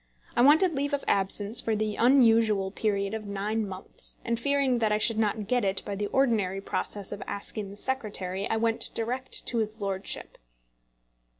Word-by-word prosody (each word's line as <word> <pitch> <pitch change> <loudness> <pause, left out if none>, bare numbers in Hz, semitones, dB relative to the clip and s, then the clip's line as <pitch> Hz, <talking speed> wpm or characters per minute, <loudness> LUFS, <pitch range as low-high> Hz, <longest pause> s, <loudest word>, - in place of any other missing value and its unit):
I - - +3
wanted 315 +7 +6
leave 285 +1 0
of 285 - -6
absence 200 +3 +2
for 225 - 0
the 215 0 -1
unusual 225 -6 +4
period 200 -1 -1
of 220 -2 -5
nine 205 +2 -2
months, 190 -1 -6
and 235 -1 -1
fearing 275 -1 +1
that 220 -2 +1
I 210 - +3
should 220 +1 +2
not 215 -1 0
get 245 +1 +1
it 195 -1 0
by 205 - -4
the 205 +1 -2
ordinary 215 -7 +1
process 200 0 -4
of 205 - -6
asking 200 0 -5
the 200 - -10
Secretary, 205 -6 -3
I 225 - +1
went 225 0 +1
direct 250 +3 -2
to 235 - 0
his 220 0 -3
lordship. 195 -1 -4
215 Hz, 180 wpm, -28 LUFS, 200-235 Hz, -, wanted